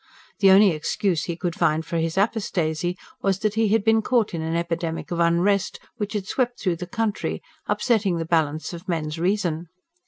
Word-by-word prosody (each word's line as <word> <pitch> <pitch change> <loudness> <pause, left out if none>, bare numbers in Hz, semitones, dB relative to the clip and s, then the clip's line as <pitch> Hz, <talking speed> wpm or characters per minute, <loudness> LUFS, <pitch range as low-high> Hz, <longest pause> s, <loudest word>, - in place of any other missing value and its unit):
The 195 -2 +6
only 195 +1 +7
excuse 170 +3 -1
he 170 - -3
could 175 0 -2
find 160 -1 +1
for 170 - -3
his 165 +1 -1
apostasy 180 -5 0 0.2
was 195 -2 +1
that 210 +1 -1
he 225 0 +2
had 215 0 +2
been 225 0 +4
caught 230 -3 +1
in 165 - -2
an 160 +1 -2
epidemic 170 -1 -3
of 170 - -2
unrest, 175 +4 +2 0.2
which 210 -2 -3
had 205 -3 -2
swept 245 +3 -1
through 180 -4 0
the 180 +1 -6
country, 225 0 -2 0.2
upsetting 210 -7 +1
the 165 - -2
balance 160 -1 0
of 175 +3 -9
men's 155 -2 -2
reason. 175 -3 0
180 Hz, 190 wpm, -24 LUFS, 165-205 Hz, 0.2 s, only